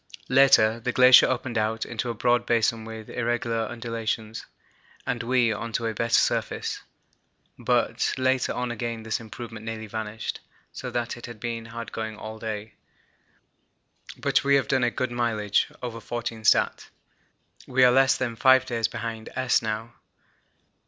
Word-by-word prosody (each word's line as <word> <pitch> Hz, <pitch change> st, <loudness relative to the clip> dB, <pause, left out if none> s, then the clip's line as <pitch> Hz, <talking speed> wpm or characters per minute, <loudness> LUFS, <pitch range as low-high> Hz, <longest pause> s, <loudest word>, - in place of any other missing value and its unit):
Later, 120 Hz, -4 st, +5 dB
the 125 Hz, +2 st, -2 dB
glacier 125 Hz, 0 st, +8 dB
opened 125 Hz, -2 st, -1 dB
out 110 Hz, +1 st, -1 dB
into 120 Hz, +1 st, -4 dB
a 115 Hz, -, -3 dB
broad 120 Hz, +2 st, +2 dB
basin 115 Hz, -1 st, +1 dB
with 110 Hz, -1 st, -8 dB
irregular 115 Hz, -2 st, -1 dB
undulations, 115 Hz, -1 st, -4 dB, 0.6 s
and 120 Hz, -1 st, -2 dB
we 120 Hz, -1 st, +2 dB
on 115 Hz, +2 st, -5 dB
to 115 Hz, -, -1 dB
a 115 Hz, -, -1 dB
better 115 Hz, +2 st, +1 dB
surface, -, -, 0 dB, 0.8 s
but -, -, +1 dB
later 130 Hz, 0 st, +1 dB
on 125 Hz, -1 st, -2 dB
again 115 Hz, -1 st, -4 dB
this 110 Hz, 0 st, -2 dB
improvement 115 Hz, 0 st, -9 dB
nearly 110 Hz, -1 st, -5 dB
vanished, 110 Hz, 0 st, -5 dB, 0.3 s
so -, -, -6 dB
that 120 Hz, 0 st, -3 dB
it 120 Hz, -, -9 dB
has 120 Hz, -, -8 dB
been 115 Hz, +1 st, -5 dB
hard 115 Hz, 0 st, -7 dB
going 110 Hz, -1 st, -5 dB
all 110 Hz, 0 st, -8 dB
day, 110 Hz, -1 st, -5 dB, 1.4 s
but -, -, +1 dB
we 140 Hz, 0 st, +4 dB
have 135 Hz, -, +2 dB
done 130 Hz, -2 st, +2 dB
a 120 Hz, -, +3 dB
good 130 Hz, +1 st, -3 dB
mileage 110 Hz, -4 st, 0 dB
(over 115 Hz, -2 st, -5 dB
14 115 Hz, -1 st, -5 dB
stat.). -, -, +2 dB, 0.8 s
We 130 Hz, 0 st, +3 dB
are 125 Hz, -, +7 dB
less 135 Hz, +1 st, +4 dB
than 120 Hz, -3 st, -2 dB
five 130 Hz, +2 st, +5 dB
days 115 Hz, -3 st, 0 dB
behind 115 Hz, -1 st, -6 dB
S. 130 Hz, -1 st, +2 dB
now. 110 Hz, +1 st, -4 dB
115 Hz, 160 wpm, -25 LUFS, 110-125 Hz, 1.4 s, glacier